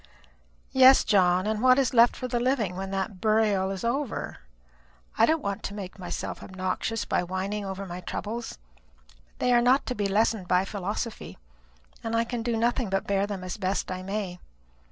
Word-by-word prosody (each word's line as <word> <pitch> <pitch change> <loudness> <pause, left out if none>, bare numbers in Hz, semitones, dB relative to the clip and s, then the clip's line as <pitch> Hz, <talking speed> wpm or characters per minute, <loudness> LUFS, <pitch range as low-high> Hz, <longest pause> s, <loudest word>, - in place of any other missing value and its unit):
"Yes, 265 0 +7
John; 185 -2 +3
and 215 0 -1
what 255 0 +6
is 265 -2 +1
left 235 0 +6
for 255 - -4
the 240 -1 -1
living 240 -7 0
when 190 +1 -4
that 195 -1 -3
burial 215 -3 +2
is 195 -1 -5
over? 260 +2 -2 0.8
I - - +4
don't 320 -1 +1
want 200 +1 -3
to 200 - -5
make 195 -1 -8
myself 180 - -5
obnoxious 185 +4 -3
by - - +1
whining 190 +3 -3
over 195 0 -5
my 180 -1 -7
troubles, 225 +6 -5 0.4
but - - -28 0.2
they 250 - +2
are 240 - +5
not 255 +3 +3
to 250 - -2
be 205 -3 -1
lessened 210 -1 +1
by 180 +1 +3
philosophy, 205 +3 -5 0.7
and 225 0 -2
I 230 - +3
can 235 0 -4
do 235 0 -1
nothing 235 0 0
but 195 0 -1
bear 200 0 +1
them 200 -3 -5
as 185 +2 -5
best 190 -1 -2
I 185 0 -4
may. 190 -2 -4
205 Hz, 190 wpm, -27 LUFS, 190-235 Hz, 0.8 s, Yes